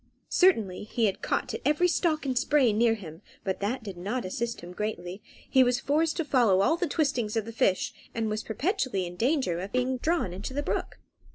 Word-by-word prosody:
Certainly 220 - +3
he 220 -2 +1
caught - - -2
at - - -4
every 300 +4 +3
stalk 330 -4 +1
and 260 -2 -1
spray 260 -2 +3
near 225 +1 +3
him, 165 -5 -10 0.2
but 190 -1 -2
that 225 +5 -2
did 195 -4 -7
not 210 +7 -3
assist 230 +5 -3
him 175 +1 -9
greatly; 190 -2 -4 0.3
he 260 -1 +5
was 245 -1 +2
forced 310 +3 +1
to 330 - -1
follow 230 -9 +4
all 320 - +3
the 350 +1 -1
twistings 255 -9 0
of 220 - 0
the 230 - -6
fish, 190 -4 +1 0.2
and 225 -1 0
was 215 0 -2
perpetually 255 - -1
in 175 0 -7
danger 240 - +1
of 190 +3 -5
being 255 +1 0
drawn 315 - 0
into 200 +8 -6
the 290 - -1
brook. - - -3
230 Hz, 205 wpm, -28 LUFS, 195-280 Hz, 0.3 s, he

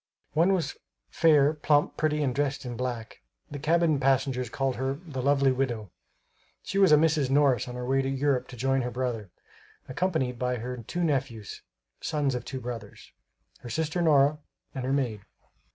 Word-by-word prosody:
One 170 +5 +4
was 180 -4 -1 0.3
fair, 150 -2 +4
plump, 150 -1 +2
pretty 150 -1 0
and 130 -3 0
dressed 145 0 -1
in 120 -1 -5
black; 120 -2 -5 0.3
the 145 - -5
cabin 160 0 +2
passengers 135 -2 +1
called 135 +1 -1
her 130 +2 -1
"the 145 -4 -6
lovely 140 0 +3
Widow." 120 -7 -2 0.7
She 195 - -2
was 190 -4 +6
a - - +9
Mrs. 150 -3 +2
Morris 135 -3 +3
on 125 - -6
her 125 0 -4
way 135 +2 +2
to 135 - -2
Europe 135 -1 0
to 125 - -11
join 135 +2 +1
her 125 - -2
brother, 120 -5 -3 0.6
accompanied 130 -5 -1
by 125 0 0
her 125 +2 -5
two 175 +10 -4
nephews 130 - -2 0.4
(sons 145 -4 -1
of 125 - -4
two 130 - -5
brothers), 120 -1 -8 0.5
her 120 - -9
sister 160 +7 -1
Nora, 150 -2 +4 0.3
and 130 -1 -4
her 130 - -1
maid. 120 -7 -1
135 Hz, 175 wpm, -27 LUFS, 125-150 Hz, 0.7 s, a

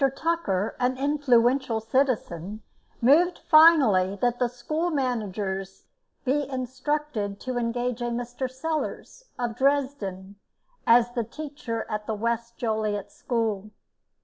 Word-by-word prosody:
Tucker, 275 - -1
an 255 +1 +1
influential 260 -4 +2
citizen, 220 - -1 0.4
moved 325 +9 +5
finally 305 - +5
that 245 +1 +1
the 250 - +3
school 305 +8 -2
managers 205 - -3 0.4
be 280 +1 0
instructed 260 -4 -3
to 255 -1 -2
engage 240 +1 -2
a - - -1
Mr. 245 +2 -3
Sellars, 315 - -4
of 240 -2 -2
Dresden, 245 -8 -1 0.5
as 240 +1 +5 0.2
teacher 280 -6 -5
at 210 0 -4
the 220 - -1
West 235 +2 -2
Joliet 215 -3 -2
School. 220 -4 -2
245 Hz, 110 wpm, -26 LUFS, 215-275 Hz, 0.5 s, moved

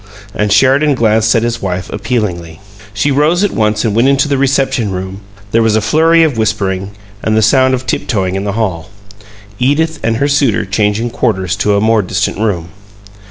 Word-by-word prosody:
and 105 -1 -1
Sheridan 135 +5 +3
glanced 110 -2 +2
across - - +3
at 115 - +1
his 120 0 -2
wife 90 -1 -3
appealingly. 100 -8 -3 0.3
She 105 +8 -1
rose 155 +7 +2
at 205 - +1
once 105 0 0
and 105 -2 -1
went 120 +3 +3
into 140 +1 +2
the 140 - 0
"reception 135 -5 0
room"; 95 +1 -6 0.3
there 115 - +2
was 110 -1 +2
a - - +3
flurry 160 +9 +3
of 145 -8 0
whispering, 100 -3 -1 0.3
and 110 0 0
the 110 - +3
sound 130 +4 +3
of 130 0 -7
tiptoeing 95 -8 -2
in 95 +1 -3
the 100 -1 -3
hall 95 -8 -3 0.7
Edith 155 +5 0
and 115 -1 0
her 140 - +1
suitor 140 -8 +1
changing 105 +4 -1
quarters 95 -7 -1
to 105 0 +1
a 100 - +1
more 110 0 +2
distant 95 +1 -2
room. 90 -7 -2
110 Hz, 195 wpm, -13 LUFS, 100-130 Hz, 0.7 s, Sheridan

